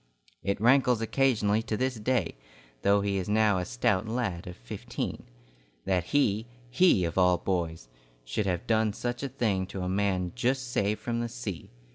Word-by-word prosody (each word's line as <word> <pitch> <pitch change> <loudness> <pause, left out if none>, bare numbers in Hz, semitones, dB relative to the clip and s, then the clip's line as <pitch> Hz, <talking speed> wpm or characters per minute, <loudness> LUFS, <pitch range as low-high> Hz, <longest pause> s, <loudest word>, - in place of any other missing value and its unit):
It 100 +1 -1
rankles 125 +1 +4
occasionally 115 -3 +2
to 110 -1 -3
this 130 0 -1
day, 115 -4 0 0.5
though 100 0 +4
he 100 -1 0
is 95 +1 -3
now 105 -2 +3
a 90 - -2
stout 115 -3 0
lad 110 -8 -2
of 90 - -8
fifteen. - - -5 0.6
That 90 -3 +1
he, 110 -3 +1 0.2
he 125 - +4
of 85 +3 -1
all 90 -1 +5
boys, 85 -7 -2 0.4
should 80 - -2
have 90 -2 -1
done 110 -2 +2
such 120 +2 -3
a 140 - -3
thing 100 -7 0
to 95 -1 -5
a - - -2
man 95 -2 0
just 125 +1 -1
saved 105 -1 0
from 115 -1 -2
the 120 0 -2
sea! 95 -7 -6
105 Hz, 175 wpm, -28 LUFS, 95-120 Hz, 0.6 s, all